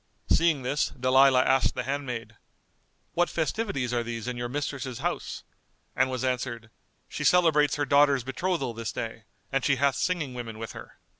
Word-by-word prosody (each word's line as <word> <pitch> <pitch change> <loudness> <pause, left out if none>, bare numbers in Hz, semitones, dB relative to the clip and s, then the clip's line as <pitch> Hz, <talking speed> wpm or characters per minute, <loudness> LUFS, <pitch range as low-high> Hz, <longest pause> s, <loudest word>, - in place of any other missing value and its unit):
Seeing 160 -5 +3
this, 140 +4 0
Dalilah 130 0 +5
asked 130 -1 +2
the 125 - -2
handmaid, 125 -5 -4 0.8
"What 175 0 +2
festivities 160 - -1
are 120 - +1
these 115 -1 -5
in 125 - -2
your 120 0 -4
mistress's 135 -2 -4
house;" - - -3 0.5
and 130 +1 +2
was 130 -1 -3
answered 120 -3 -2 0.4
"She - - -5
celebrates 160 -5 +4
her 145 0 0
daughter's 140 -2 +4
betrothal 135 -1 -2
this 115 -1 -4
day, 115 -1 -6 0.3
and 135 -1 0
she 140 - +3
hath 140 +1 +2
singing 155 -1 -1
women 115 -3 -6
with 115 0 -6
her." - - -11
130 Hz, 165 wpm, -27 LUFS, 120-145 Hz, 0.8 s, Dalilah